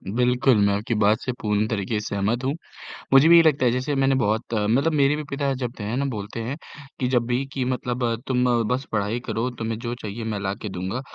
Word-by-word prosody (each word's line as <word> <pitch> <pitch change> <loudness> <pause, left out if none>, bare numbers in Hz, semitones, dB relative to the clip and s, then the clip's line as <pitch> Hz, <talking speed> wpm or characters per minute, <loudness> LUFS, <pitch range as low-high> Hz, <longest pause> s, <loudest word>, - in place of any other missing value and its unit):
बिल्कुल, 125 0 +3
मैं 100 - +2
आपकी 105 +4 -2
बात 105 +2 +4
से 130 - -2
पूर्ण 105 0 +1
तरीके 105 0 -2
से 105 - -7
सहमत 110 +6 0
हूँ। 135 +2 0 0.6
मुझे 135 +3 +7
भी 170 - +9
ये - - +9
लगता 150 -5 +3
है 120 - +4
जैसे 130 +4 -1
मैंने 135 0 +2
बहुत 110 -1 0
मतलब 115 +9 +2
मेरे 145 -1 +3
भी 150 - -4
पिता 140 -1 -1
जब 125 -2 -2
त - - -8
है 105 +3 -3
ना 140 - 0
बोलते 110 -4 -5
हैं 125 +5 -3 0.4
कि 125 - 0
जब 125 -2 +1
भी 125 +2 0
कि 135 - -1
मतलब 125 -1 -2 0.3
तुम 125 -1 +1 0.2
बस 130 +2 -1
पढ़ाई 105 +2 -1
करो 115 +3 -1
तुम्हें 115 -1 -2
जो 120 0 -4
चाहिए 110 +2 -5
मैं 110 -2 -3
ला 100 0 -2
के 105 - -4
दूँगा, 95 +7 -4
120 Hz, 235 wpm, -24 LUFS, 105-130 Hz, 0.6 s, भी